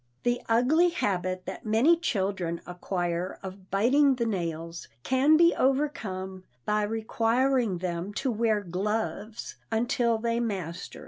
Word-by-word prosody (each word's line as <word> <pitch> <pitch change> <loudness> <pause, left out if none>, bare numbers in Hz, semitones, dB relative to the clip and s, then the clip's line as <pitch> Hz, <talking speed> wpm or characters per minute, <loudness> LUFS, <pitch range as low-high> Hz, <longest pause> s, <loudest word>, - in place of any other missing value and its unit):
The 245 0 +1
ugly 275 +10 +4
habit 185 - -2
that - - -7
many 230 +10 +4
children 190 - -2
acquire 175 0 -3
of 190 0 -9
biting 265 +8 +4
the 235 -2 -1
nails 170 -5 -4 0.2
can 275 +4 +4
be 340 +1 +5
overcome 195 -10 -1 0.2
by 210 0 +1
requiring 225 +1 +1
them 175 +1 -3
to 270 -2 0
wear 220 -2 +1
gloves 210 +4 -3
until 235 0 +1
they 230 +1 -1
master 185 -7 -4
it. - - -10
215 Hz, 130 wpm, -27 LUFS, 185-245 Hz, 0.2 s, be